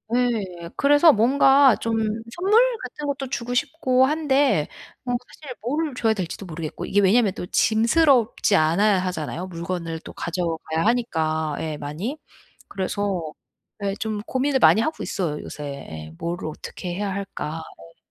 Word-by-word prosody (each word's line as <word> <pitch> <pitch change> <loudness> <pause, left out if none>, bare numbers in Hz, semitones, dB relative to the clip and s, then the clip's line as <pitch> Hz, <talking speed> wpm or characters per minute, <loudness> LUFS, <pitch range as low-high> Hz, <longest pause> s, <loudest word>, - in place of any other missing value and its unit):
예. 200 -9 -1
그래서 290 +3 +6
뭔가 270 +2 +5
좀 225 -1 0 0.3
선물 400 +6 +4 0.2
같은 295 - -7
것도 275 -1 -3
주고 245 -1 -3
싶고 255 -1 +2
한데 280 - +2 0.4
어 245 - -2 0.2
사실 280 -5 -10
뭐를 290 +5 -1
줘야 225 -3 +2
될지도 190 -1 -5
모르겠고 165 0 -6
이게 205 +2 +2
왜냐하면 200 +1 +4
또 180 - -6
짐스럽지 230 - +3
않아야 190 +5 +3
하잖아요 180 -1 -3
물건을 170 -2 -4
또 - - -11
가져가야 165 -1 -2
하니까 160 -10 0
예 160 -1 -3
많이. 160 - -5 0.5
그래서 195 -1 -2 0.6
예 195 -1 0
좀 215 -2 -3
고민을 265 +1 0
많이 220 - +6
하고 315 - -2
있어요 160 -6 -2
요새. 150 - -8 0.3
예. 80 0 -8
'뭐를 170 0 -4
어떻게 175 +3 -7
해야 200 +1 -2
할까?' 185 -5 -5
어. 85 - -14
205 Hz, 310 characters per minute, -23 LUFS, 170-255 Hz, 0.6 s, 그래서